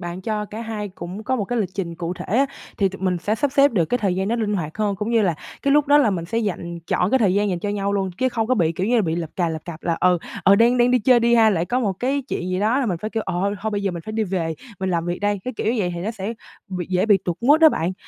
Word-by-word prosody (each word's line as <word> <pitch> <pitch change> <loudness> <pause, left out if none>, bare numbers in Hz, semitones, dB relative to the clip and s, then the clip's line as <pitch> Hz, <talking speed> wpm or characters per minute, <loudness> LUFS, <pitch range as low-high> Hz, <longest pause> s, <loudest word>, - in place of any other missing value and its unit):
bạn 175 +1 -5
cho 210 +1 -2
cả 210 +2 -8
hai 220 -2 -4
cũng 185 +2 -8
có 260 - 0
một 210 - -1
cái 245 +3 -2
lịch 200 -5 0
trình 175 -4 -3
cụ 170 +1 -4
thể - - -8
á, 275 +1 +4 0.3
thì 195 - +3
tụi 190 - -10
mình 180 -2 +1
sẽ 205 +5 -1
sắp 270 +4 -1
xếp 280 -2 +4
được 175 -6 +2
cái 245 +9 -1
thời 195 -3 0
gian 190 +2 -1
đó 235 - 0
linh 210 -2 -1
hoạt 165 -1 -4
hơn 205 -2 0
cũng 210 +4 -3
như 230 -2 +3
là 175 -4 +1 0.3
cái 280 -1 +2
lúc 295 0 +4
đó 290 +1 +6
là 240 -8 +4
mình 170 -3 -2
sẽ 225 +7 -2
dành 175 -5 -3
trọn 180 +2 +1
cái 265 - +4
thời 195 -5 +2
gian 205 0 +2
dành 180 -2 -1
cho 205 - -3
nhau 200 -1 -1
luôn, 195 -2 0
chứ 260 - +2
không 225 -3 -1
có 255 - +2
bị, 165 -7 +1
kiểu 185 +4 -2
như, 240 -1 +3
bị 160 -4 -1
lập 165 -2 -4
cà 175 -2 +1
lập 160 -1 -5
cập 165 -2 -8
là, 170 -1 0
ừ, 180 -1 +4 0.3
ừ, 195 - +7
đang 235 +4 +4
đang 240 0 +4
đi 250 - +4
chơi 240 +2 +4
đi 235 0 +3
ha, 225 -2 +6
lại 170 -4 0
có 245 +7 -1
một 210 -6 0
cái 265 +8 -1
chuyện 180 - -3
gì 185 - -1
đó 225 +5 +2
là 260 - 0
mình 175 -5 -1
phải 215 +4 -5
kiểu: 225 -1 -2
"Ờ, 190 +2 -1
thôi 220 +1 -2
bây 205 -1 -2
giờ 195 - 0
mình 170 -2 -6
phải 215 - -7
đi 220 0 0
về, 175 -4 -2 0.3
mình 190 0 -1
làm 170 -1 -1
việc 175 0 -2
đây." 205 -1 0
Cái 255 - -3
kiểu - - -3
như 250 - -2
vậy 180 -3 0
thì 170 - -5
nó 205 +5 -2
sẽ 220 +1 -5 0.3
bị 180 -3 -4
dễ 185 +3 +1
bị 205 -3 +5
tụt 175 -2 -2
mood 290 +7 +5
á, 320 - +9
bạn. 175 - -1
200 Hz, 340 wpm, -22 LUFS, 180-230 Hz, 0.3 s, á